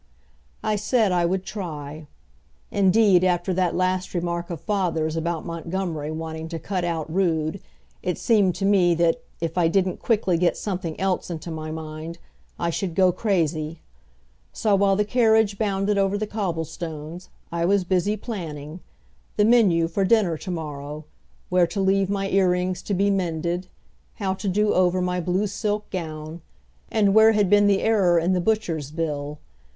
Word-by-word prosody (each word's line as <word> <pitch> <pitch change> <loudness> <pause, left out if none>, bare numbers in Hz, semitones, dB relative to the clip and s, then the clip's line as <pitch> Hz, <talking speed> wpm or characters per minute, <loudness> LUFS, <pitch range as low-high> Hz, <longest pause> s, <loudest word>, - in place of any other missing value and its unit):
I 215 -1 +1
said 215 0 +2
I 175 -1 +2
would 185 +1 -1
try. 155 -6 -6 0.6
Indeed, 195 -1 +4
after 180 0 +1
that 180 -1 0
last 185 0 -1
remark 170 0 -2
of 170 -3 -5
father's 165 -6 -1
about 165 0 -2
Montgomery 165 -2 -3
wanting 160 0 -5
to 165 - -4
cut 180 +3 -3
out 165 -3 -2
Rood 165 -2 0 0.4
it 180 -1 -2
seemed 205 -6 +2
to 195 - -2
me 185 -4 +4
that, 170 +8 +2 0.2
if 165 +1 -1
I 170 - +4
didn't 185 +1 +1
quickly 200 -7 +1
get 175 0 +2
something 180 -5 -4
else 190 -1 -1
into 170 0 -5
my 155 -1 -5
mind, 155 +1 -6 0.4
I 170 - -1
should 175 0 -3
go 185 -1 +5
crazy. 165 -5 -1 0.7
So 215 -2 0
while 195 0 +4
the 210 +1 +1
carriage 220 -3 +3
bounded 200 -1 +1
over 195 +1 +1
the 215 - -2
cobblestones, 170 -4 -5 0.2
I 170 0 0
was 195 +1 +3
busy 190 +3 0
planning 165 - -6 0.6
the 210 - +4
menu 200 -8 +4
for 185 +4 -1
dinner 190 -4 +3
to 185 - -8
morrow, 150 -3 -5 0.4
where 180 -1 +3
to 185 +4 -4
leave 195 0 +2
my 195 -1 -1
ear 190 -1 +3
rings 180 +1 -1
to 200 - -2
be 200 +2 +2
mended, 175 -1 -1 0.5
how 195 -2 -1
to 195 +2 -5
do 210 +3 +2
over 185 0 +3
my 180 0 -1
blue 180 +4 0
silk 210 +1 -2
gown, 160 -2 -5 0.5
and 205 -3 +2
where 220 +1 +7
had 205 -3 +2
been 205 0 +6
the 200 -1 +2
error 195 -6 +3
in 170 +3 +2
the 180 - +1
butcher's 170 -9 -1
bill. 150 -2 -3
180 Hz, 165 wpm, -24 LUFS, 165-200 Hz, 0.7 s, where